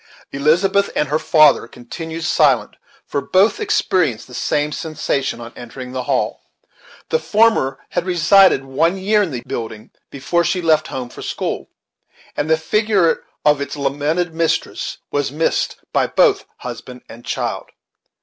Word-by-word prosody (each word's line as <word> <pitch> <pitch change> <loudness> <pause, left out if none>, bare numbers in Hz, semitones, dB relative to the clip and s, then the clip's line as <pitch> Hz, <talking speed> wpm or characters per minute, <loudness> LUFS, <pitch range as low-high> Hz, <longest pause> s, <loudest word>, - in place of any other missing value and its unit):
Elizabeth 180 +8 +2
and 150 - 0
her 150 +2 +1
father 155 -7 +4
continued 160 +8 -7
silent, 150 -6 +3 0.3
for 140 - -2
both 190 +9 +2
experienced 185 - 0
the 125 - -15
same 150 +4 -1
sensation 155 -7 -2
on 120 0 -9
entering 125 +1 -9
the 130 -1 -4
hall. - - -1 0.7
The 160 - +2
former 165 -5 +2
had 175 - -1
resided 175 -4 +5
one 165 +8 +1
year 210 +3 +2
in 195 - 0
the 125 -5 -5
building 110 -2 -6 0.2
before 170 +5 0
she 180 - 0
left 160 -3 +2
home 125 -2 -5
for - - -11
school, - - -4 0.7
and 145 - -2
the 160 - +4
figure 200 0 +1 0.2
of 150 -1 +4
its 140 0 -4
lamented 145 +5 -1
mistress 165 0 -1
was 145 -2 -1
missed 155 +3 0 0.2
by - - +2
both - - +3
husband 125 +1 -8
and 120 +1 -12
child. - - -3
155 Hz, 150 wpm, -19 LUFS, 135-175 Hz, 0.7 s, resided